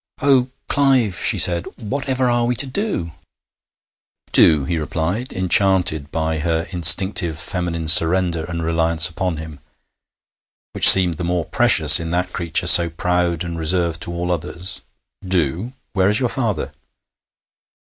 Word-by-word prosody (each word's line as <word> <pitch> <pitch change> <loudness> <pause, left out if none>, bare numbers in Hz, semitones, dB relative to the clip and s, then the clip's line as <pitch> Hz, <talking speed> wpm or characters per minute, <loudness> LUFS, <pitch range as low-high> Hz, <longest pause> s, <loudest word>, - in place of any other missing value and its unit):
'Oh, 135 -2 +1 0.2
Clive!' 130 -8 0
she - - +4
said. 85 -1 +2
'Whatever 130 +2 -4
are 120 -1 -1
we 125 - -2
to 130 - -1
do?' 135 - -5 1.2
'Do?' 75 -4 +4
he 85 +1 -4
replied, 90 +10 -5
enchanted 90 -5 0
by 80 0 -4
her 80 +1 -3
instinctive 85 -1 +3
feminine 85 -2 -6
surrender 85 +1 +3
and 85 -2 -7
reliance 80 0 +1
upon 90 0 -5
him, 80 -2 -11 1.1
which - - +8
seemed 90 -4 +5
the 90 - -7
more 85 -1 -3
precious 75 -2 +5
in 80 -1 -7
that 90 +1 -4
creature 85 -2 -1
so 85 -1 +7
proud 85 0 -3
and 85 -1 -8
reserved 85 0 -2
to - - -4
all 90 +1 -5
others. 90 +2 -5 0.4
'Do! 90 - -3 0.2
Where 95 -1 0
is 105 - 0
your 125 -2 -2
father?' 115 - -4
85 Hz, 140 wpm, -17 LUFS, 80-95 Hz, 1.2 s, which